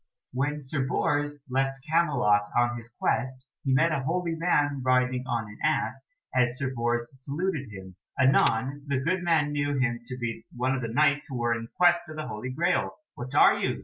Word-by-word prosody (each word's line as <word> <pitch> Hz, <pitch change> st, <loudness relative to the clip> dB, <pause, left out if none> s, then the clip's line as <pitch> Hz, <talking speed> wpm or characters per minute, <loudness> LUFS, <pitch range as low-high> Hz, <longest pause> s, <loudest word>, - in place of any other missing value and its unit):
When 145 Hz, +3 st, -1 dB
Sir 135 Hz, +1 st, -1 dB
Bors 145 Hz, 0 st, -1 dB
left 135 Hz, +1 st, 0 dB
Camelot 140 Hz, -11 st, +2 dB
on 120 Hz, 0 st, +2 dB
his 115 Hz, -1 st, -8 dB
quest 130 Hz, +2 st, -2 dB, 0.2 s
he 135 Hz, -, 0 dB
met 150 Hz, +6 st, +4 dB
a 155 Hz, -, 0 dB
holy 170 Hz, +4 st, -1 dB
man 145 Hz, -4 st, +1 dB
riding 125 Hz, 0 st, +1 dB
on 115 Hz, -2 st, -1 dB
an 105 Hz, -, -13 dB
ass, -, -, 0 dB, 0.2 s
and 125 Hz, -1 st, +3 dB
Sir 130 Hz, +1 st, -3 dB
Bors 120 Hz, -1 st, -1 dB, 0.2 s
saluted 150 Hz, -, -2 dB
him. 95 Hz, -2 st, -10 dB, 0.2 s
Anon 130 Hz, +1 st, +3 dB
the 140 Hz, -2 st, 0 dB
good 175 Hz, +7 st, 0 dB
man 160 Hz, -4 st, +2 dB
knew 145 Hz, -1 st, -1 dB
him 120 Hz, -3 st, 0 dB
to 125 Hz, +1 st, -6 dB
be 120 Hz, -2 st, -4 dB
one 130 Hz, +2 st, 0 dB
of 130 Hz, -, -2 dB
the 115 Hz, -, -2 dB
Knights 145 Hz, +4 st, +2 dB
who 135 Hz, -, -5 dB
were 120 Hz, 0 st, +1 dB
in 115 Hz, -1 st, -5 dB
quest 175 Hz, -1 st, +5 dB
of 155 Hz, -, -8 dB
the 155 Hz, 0 st, -4 dB
Holy 105 Hz, +4 st, -5 dB
Graal. 170 Hz, +7 st, 0 dB, 0.2 s
"What 130 Hz, +3 st, -7 dB
are -, -, +6 dB
you?" -, -, -1 dB
130 Hz, 195 wpm, -27 LUFS, 120-150 Hz, 0.2 s, are